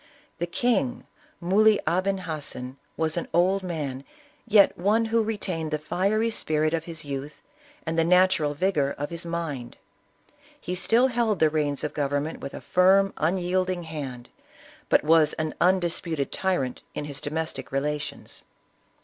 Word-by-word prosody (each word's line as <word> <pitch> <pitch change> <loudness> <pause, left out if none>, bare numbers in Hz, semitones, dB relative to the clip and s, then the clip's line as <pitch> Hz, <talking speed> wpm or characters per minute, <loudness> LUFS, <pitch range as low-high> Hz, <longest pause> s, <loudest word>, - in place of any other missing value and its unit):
The 175 - -1
king, 170 - 0 0.3
Muley 205 +4 +4
Aben 190 +2 +1
Hassen, 140 -6 -6 0.2
was 160 0 0
an 170 - -2
old 185 +3 +3
man, 150 -7 -4 0.4
yet 210 -3 +6
one 210 +6 +2
who 225 +1 +2
retained 190 -7 -3
the 155 - 0
fiery 200 +8 0
spirit 155 -6 0
of 165 -1 -1
his 160 -3 -7
youth, 140 +1 -6 0.5
and 165 0 -1
the - - +4
natural 180 -3 +3
vigor 150 -5 +1
of 145 +2 -4
his 170 0 -5
mind. 160 -8 -4 0.8
He 180 - -5
still 230 +7 +3
held 230 -4 +1
the 155 -1 +3
reins 145 -2 -1
of 150 - -2
government 145 +1 -1
with 140 - -7
a - - -7
firm, 190 +2 +4
un 165 +5 +1
yielding 185 0 -1
hand, 140 -7 -7 0.6
but - - +4
was 155 0 +4
an 155 -1 -3
undisputed 170 -5 +1
tyrant 175 -10 -1
in 145 - -3
his 145 -1 -4
do - - -4
mestic 155 -4 -4
relations. 145 +2 -3
165 Hz, 155 wpm, -26 LUFS, 150-185 Hz, 0.8 s, yet